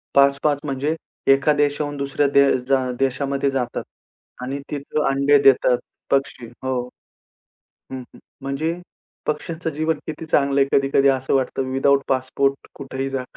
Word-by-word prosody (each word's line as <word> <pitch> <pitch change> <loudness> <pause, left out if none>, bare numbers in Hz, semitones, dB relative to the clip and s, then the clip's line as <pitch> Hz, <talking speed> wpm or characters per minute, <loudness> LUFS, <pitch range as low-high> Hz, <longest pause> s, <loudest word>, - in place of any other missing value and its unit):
5-5 140 +1 +3
म्हणजे 145 +3 -1 0.4
एका 140 +2 +3
देशाहून 145 0 0
दुसऱ्या 140 +1 0
दे 140 - +7 0.3
जा 135 0 +4 0.2
देशामध्ये 135 +1 0
जातात 125 -3 -2 0.6
आणि 135 +3 -4
तिथं 150 +1 -2
अंडे 140 +1 +4
देतात 125 -2 +5 0.3
पक्षी. 135 -3 0 0.2
हो. 130 0 -1 1.2
हं, 130 - -4
हं. 125 - -15 0.2
म्हणजे 140 +4 -2 0.5
पक्ष्यांचं 160 +2 -3
जीवन 155 +2 -1
किती 155 +1 -6
चांगलंय 140 -2 +3
कधी-कधी 135 0 +3
असं 135 0 +1
वाटतं 130 0 -1
विथआऊट 140 +1 +3
पासपोर्ट 135 +1 0
कुठेही 135 -1 -5
जा. 135 -1 -2
140 Hz, 130 wpm, -22 LUFS, 135-145 Hz, 1.2 s, दे